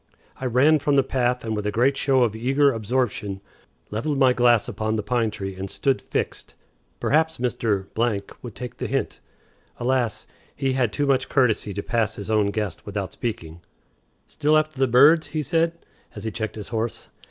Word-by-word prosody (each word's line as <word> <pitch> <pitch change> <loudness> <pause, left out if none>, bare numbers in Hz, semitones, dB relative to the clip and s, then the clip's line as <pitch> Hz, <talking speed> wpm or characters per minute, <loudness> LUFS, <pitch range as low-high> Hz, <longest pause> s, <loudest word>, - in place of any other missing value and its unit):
I 130 - -3
ran 140 +6 +4
from 145 0 +1
the 135 - +5
path 125 -2 0
with 110 -2 -2
a - - 0
great 130 +6 +2
show 135 -2 +3
of 110 -3 0
eager 135 +5 +3
absorption, 110 -3 -2 0.5
leveled 140 +8 -1
my 130 -2 +5
glass 120 -3 +3
upon 110 -1 -2
the 105 - -2
pine 115 +1 +1
tree, 95 -2 -5
and 95 +1 -6
stood 135 +5 0
fixed. - - -4 0.4
Perhaps 160 +2 +2
Mr. 115 -5 -1 0.6
would 120 -5 -9
take 125 -2 -7
the - - -3
hint. - - -2 0.6
Alas! 120 -2 0 0.3
he 135 -1 0
had 125 -4 +1
too 145 +7 0
much 135 -2 +1
courtesy 120 -6 +2
to 100 - -3
pass 115 -2 0
his 100 +2 -5
own 105 -2 +3
guest 100 -4 -3
without 100 -2 -4
speaking. 85 -8 -5 0.6
"Still 150 +1 +2
after 155 -2 -1
the 135 - +3
birds?" 145 +7 +6
he 155 -1 -3
said, 165 +2 +1 0.4
as - - -7
he 110 - -3
checked 110 -1 -4
his 105 -2 -7
horse. 115 -1 -3
120 Hz, 180 wpm, -24 LUFS, 110-135 Hz, 0.6 s, birds